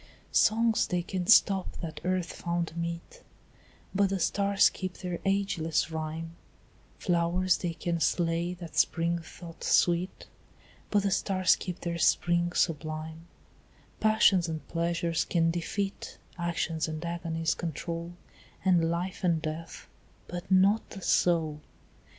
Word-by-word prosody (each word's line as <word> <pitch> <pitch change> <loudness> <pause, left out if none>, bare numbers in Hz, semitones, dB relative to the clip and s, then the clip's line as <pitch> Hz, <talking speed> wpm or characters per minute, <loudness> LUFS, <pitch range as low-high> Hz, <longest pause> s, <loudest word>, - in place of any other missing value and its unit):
Songs 225 +1 +3
they 180 -2 -1
can 180 -1 -4
stop 195 -2 +5
that 155 -3 -6
earth 180 -1 -1
found 170 -1 -3
meet, 170 - -5 0.7
But 200 0 +3
the 195 - 0
stars 200 +3 +3
keep 185 -1 -5
their 180 -2 -4
ageless 180 -5 0
rhyme; 160 +1 -4 0.7
Flowers 175 +1 +1
they 170 -2 -3
can 170 +1 -2
slay 170 +2 0
that 170 -3 -10
spring 170 0 +2
thought 165 0 -11
sweet, 175 +2 +2 0.6
But 205 -1 +2
the 200 - +1
stars 185 -1 +3
keep 180 -2 -6
their 170 -1 -3
spring 175 +1 +2
sublime; 160 0 -2 0.7
Passions 210 -5 +4
and 160 -1 -5
pleasures 170 0 0
can 165 -1 +1
defeat, 195 +4 -4 0.2
Actions 170 -2 -1
and 155 +1 -5
agonies 165 -2 -1
control, 170 +1 -5 0.5
And 175 -3 +4
life 180 +4 -3
and 170 -3 +2
death, 160 +1 -6 0.4
but 175 0 -7
not 195 +3 +5
the 195 - -9
soul. 160 -4 +2
170 Hz, 125 wpm, -29 LUFS, 165-185 Hz, 0.7 s, stop